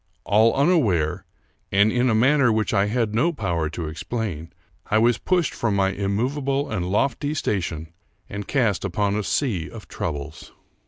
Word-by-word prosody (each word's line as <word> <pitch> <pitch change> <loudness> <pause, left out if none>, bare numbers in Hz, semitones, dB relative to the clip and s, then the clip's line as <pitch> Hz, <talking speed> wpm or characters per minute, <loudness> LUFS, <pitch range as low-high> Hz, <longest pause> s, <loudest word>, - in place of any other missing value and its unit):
All 110 +3 +3
unaware, 120 - +2 0.5
and 100 +2 +4
in 125 +2 +2
a 110 - +2
manner 130 +2 +4
which 110 0 0
I 100 -1 +3
had 110 -1 0
no 155 +10 +2
power 85 - -2
to 80 0 -5
explain, 85 0 -4 0.4
I 110 - +2
was 115 +1 +3
pushed 180 -3 +1
from 110 -4 -1
my 95 -1 +2
immovable 130 +9 -1
and 90 -4 -2
lofty 140 +8 0
station 85 - -3 0.3
and 100 0 -6
cast 115 -9 +1
upon 100 +1 0
a 105 - 0
sea 100 - -1
of - - -11
troubles. 75 +2 -6
105 Hz, 160 wpm, -23 LUFS, 95-125 Hz, 0.5 s, and